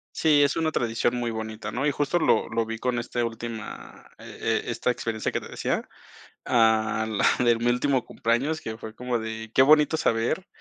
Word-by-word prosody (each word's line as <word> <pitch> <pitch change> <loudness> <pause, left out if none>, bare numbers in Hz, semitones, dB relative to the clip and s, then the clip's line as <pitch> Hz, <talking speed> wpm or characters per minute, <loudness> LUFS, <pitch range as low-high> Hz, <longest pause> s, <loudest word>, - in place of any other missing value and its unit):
Sí, 150 -2 +4
es 145 - +1
una 160 -1 0
tradición 120 +1 0
muy 120 -1 -2
bonita, 110 -1 -5
¿no? 135 +6 -2
Y - - +3
justo 145 +5 0
lo 110 - +2
lo 115 0 0
vi 115 0 -5
con 125 -1 -1
este 120 0 -2
última, 115 -1 -7
e - - -2
e - - -5
esta 125 - 0
experiencia 115 -2 -3
que - - -1
te - - -10
decía, - - -2 0.6
ah, 110 -1 +2
la 110 +3 +2
de 120 -1 +4
mi 120 +1 -3
último 125 +1 +1
cumpleaños, 135 +8 -1
que 110 0 -6
fue 110 0 -9
como 125 -1 -2
de, 110 0 -6
qué - - +4
bonito 150 +3 +5
saber 120 +12 0
120 Hz, 200 wpm, -25 LUFS, 110-135 Hz, 0.6 s, bonito